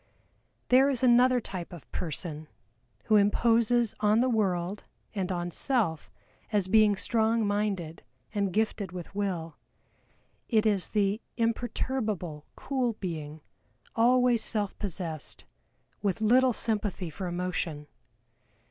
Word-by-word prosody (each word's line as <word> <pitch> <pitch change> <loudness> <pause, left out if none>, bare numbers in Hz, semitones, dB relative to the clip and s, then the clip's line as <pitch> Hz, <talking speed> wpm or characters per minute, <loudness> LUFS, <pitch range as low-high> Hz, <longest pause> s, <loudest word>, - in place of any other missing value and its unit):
There 265 +2 +6
is 260 -3 -1
another 250 +1 +5
type 185 -6 -7
of 170 -6 -12
person 155 -1 -4 0.6
who 215 - +4
imposes 230 +2 +3
on 210 +1 +3
the 255 +1 +2
world 195 -3 0 0.3
and 195 -3 -2
on 175 -1 -2
self 195 - -1 0.4
as 205 -4 +1
being 215 0 +5
strong 225 +2 +1
minded 200 -6 -2 0.3
and 200 -3 0
gifted 210 -2 -1
with 180 0 -8
Will. 180 -6 -3 0.9
It 220 -2 +3
is 205 -4 +2
the 205 +1 +1 0.2
imperturbable 225 - -2
cool 255 -4 -1
being, 160 -6 -6 0.5
always 245 0 +4
self 205 -3 -2
possessed, 170 -6 -5 0.6
with 200 0 0
little 250 +4 +4
sympathy 205 -6 -1
for 185 +4 -5
emotion. 175 -4 -3
205 Hz, 115 wpm, -28 LUFS, 180-230 Hz, 0.9 s, There